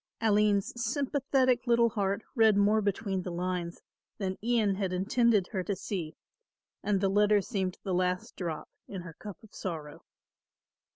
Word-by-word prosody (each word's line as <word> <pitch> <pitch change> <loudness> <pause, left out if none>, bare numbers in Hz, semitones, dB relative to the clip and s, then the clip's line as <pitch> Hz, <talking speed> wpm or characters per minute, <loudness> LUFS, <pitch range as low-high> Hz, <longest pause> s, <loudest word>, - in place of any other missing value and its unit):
Aline's 210 -2 +2
sympathetic 270 -3 +1
little 235 0 +4
heart 200 -1 -1
read 220 -5 +5
more 210 +2 +4
between 200 -1 -1
the 180 - -5
lines 175 0 -3 0.3
than 190 -2 -2
Ian 225 -4 +2
had 190 -1 -2
intended 210 +2 +2
her 190 -4 -1
to 200 +1 -2
see 175 -6 -4 0.7
and 205 -2 +1
the 195 - +2
letter 205 +1 +4
seemed 190 -3 -2
the 190 - -2
last 180 0 -1
drop 165 -4 -4 0.2
in 190 -3 -6
her 170 -2 -9
cup 205 +3 -9
of 215 - -17
sorrow. 155 -5 -6
200 Hz, 155 wpm, -30 LUFS, 185-220 Hz, 0.7 s, read